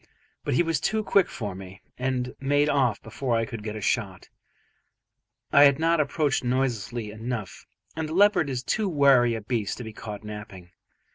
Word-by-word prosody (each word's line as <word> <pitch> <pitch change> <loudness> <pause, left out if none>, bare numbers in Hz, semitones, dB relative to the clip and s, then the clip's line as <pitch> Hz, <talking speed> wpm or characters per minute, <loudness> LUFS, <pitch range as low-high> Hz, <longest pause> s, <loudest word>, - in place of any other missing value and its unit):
But - - -1
he 175 - +4
was 165 -3 0
too 215 +7 0
quick 200 -2 +3
for 105 -4 -5
me, 95 0 -10 0.2
and 125 -1 -2
made 145 +2 +2
off 130 -6 +2
before 120 +2 -2
I 115 - 0
could 115 -4 -7
get 105 0 -5
a 110 - -6
shot; 95 -4 -2 1.2
I 145 +1 +8
had 140 -1 +5
not 165 +1 +2
approached 145 -1 0
noiselessly 120 -3 -1
enough, 110 -3 -6 0.3
and 160 -1 -3
a - - -4
leopard 200 -6 +4
is 125 -2 -3
too 210 +8 0
wary 135 -7 +4
a 110 - -5
beast 105 -2 -2
to 125 - -6
be 110 -1 -8
caught 105 0 -8
napping. 105 -4 -9
125 Hz, 185 wpm, -26 LUFS, 110-145 Hz, 1.2 s, I